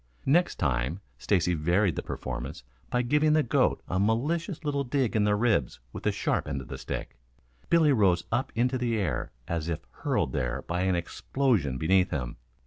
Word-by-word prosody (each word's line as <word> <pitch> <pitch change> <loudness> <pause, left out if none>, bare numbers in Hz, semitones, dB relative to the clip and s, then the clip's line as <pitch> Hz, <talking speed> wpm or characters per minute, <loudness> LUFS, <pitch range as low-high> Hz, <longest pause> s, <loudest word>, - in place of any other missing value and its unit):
Next 170 +6 +3
time 65 +4 0 0.2
Stacy 90 -3 +2
varied 85 +4 +2
the - - -2
performance 65 +1 -5 0.3
by 125 0 +1
giving 150 +5 +3
the 155 -1 +4
goat 120 - +1
a 95 - -1
malicious 150 - 0
little 140 -2 0
dig 125 -2 0
in 105 -1 +3
the 105 0 +3
ribs 105 - +1
with - - -6
the - - +1
sharp - - -1
end 70 -2 -2
of 65 - -9
the - - -6
stick. - - -6 0.5
Billy 160 -3 +5
rose 95 -8 +3
up 130 +2 0
into 125 +2 +1
the 120 -2 0
air 95 -6 -2 0.2
as 85 -1 -2
if 85 - -4
hurled - - 0
there 65 +1 -2
by 90 +1 -2
an 95 -1 +2
explosion 85 - 0
beneath 90 +5 +3
him. 65 -8 -4
100 Hz, 185 wpm, -28 LUFS, 80-130 Hz, 0.5 s, Billy